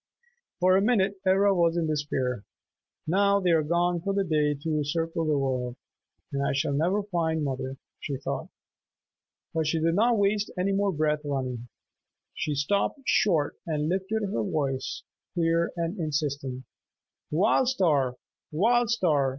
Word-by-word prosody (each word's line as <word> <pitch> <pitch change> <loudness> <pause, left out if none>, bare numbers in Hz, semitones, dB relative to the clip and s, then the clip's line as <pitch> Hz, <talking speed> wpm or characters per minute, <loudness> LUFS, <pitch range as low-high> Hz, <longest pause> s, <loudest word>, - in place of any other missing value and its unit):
For 185 +1 +4
a - - +3
minute 200 -3 +2
Ivra 195 +1 +4
was 170 -2 +2
in 170 - +1
despair. 135 -7 -1 0.6
"Now 200 +4 +3
they 180 -3 +2
are 165 -1 +4
gone 170 +2 +1
for 195 +2 -2
the 200 - +2
day 150 -4 +1
to 150 +1 -1
circle 165 +2 -1
the 150 -2 +2
world, 130 -3 -1 0.6
and 140 - -1
I 140 - 0
shall 140 +1 0
never 180 +8 +1
find 165 -5 -1
mother," 135 -1 -3 0.2
she 140 -2 -4
thought. 135 - -4 1.1
But 160 -2 0
she 160 +1 +1
did 165 +1 +2
not 230 +5 +3
waste 205 +1 +1
any 185 +2 +1
more 200 0 +1
breath 150 -2 0
running. 130 -4 -3 0.7
She 150 - -2
stopped 200 - 0
short 165 -13 +2
and 155 -1 -1
lifted 195 +4 -1
her 190 - -1
voice, 135 +3 -2 0.3
clear 170 0 +1
and 170 +4 -2
insistent, 140 -4 -2 0.7
"Wild 210 - +3
Star! 150 - +2 0.4
Wild 230 +8 +3
Star! 155 - +2
165 Hz, 150 wpm, -27 LUFS, 145-195 Hz, 1.1 s, For